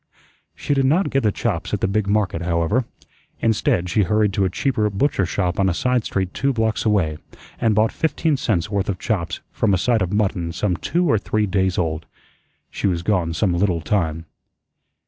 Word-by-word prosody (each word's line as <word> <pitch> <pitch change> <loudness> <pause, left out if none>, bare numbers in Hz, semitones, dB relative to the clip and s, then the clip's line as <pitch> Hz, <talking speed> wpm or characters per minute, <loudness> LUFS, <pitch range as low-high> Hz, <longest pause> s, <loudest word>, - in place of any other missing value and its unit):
She - - -1
did 135 -1 +2
not 175 +7 +2
get 135 - +2
the 105 - +2
chops 100 -2 -2
at - - -5
the - - +2
big 100 +1 0
market, 100 -5 0
however. 85 +8 0 0.5
Instead, 105 -5 +1
she 95 +5 +2
hurried 105 +1 +2
to 100 0 +1
a - - +1
cheaper 110 +1 0
butcher 100 - 0
shop 90 +1 -1
on 95 -1 +3
a 85 - -1
side 125 +4 +1
street 95 -1 -2
two 140 0 0
blocks 110 -2 0
away, 85 -8 +1 0.4
and 115 -3 +2
bought 110 +1 +3
fifteen 160 -1 0
cents' 100 -8 -1
worth 100 -1 -1
of 95 - -1
chops 95 -8 -2
from 100 -3 +1
a - - +1
side 115 +4 +1
of 90 -1 -1
mutton 95 -5 0
some 95 0 0
two 175 - 0
or 110 -8 +3
three 105 +1 0
days 95 -2 0
old. 80 -2 -2 0.6
She - - -1
was 85 -3 -1
gone 90 -5 0
some 95 0 +1
little 90 -1 +1
time. 80 -2 -1
100 Hz, 200 wpm, -21 LUFS, 90-110 Hz, 0.6 s, on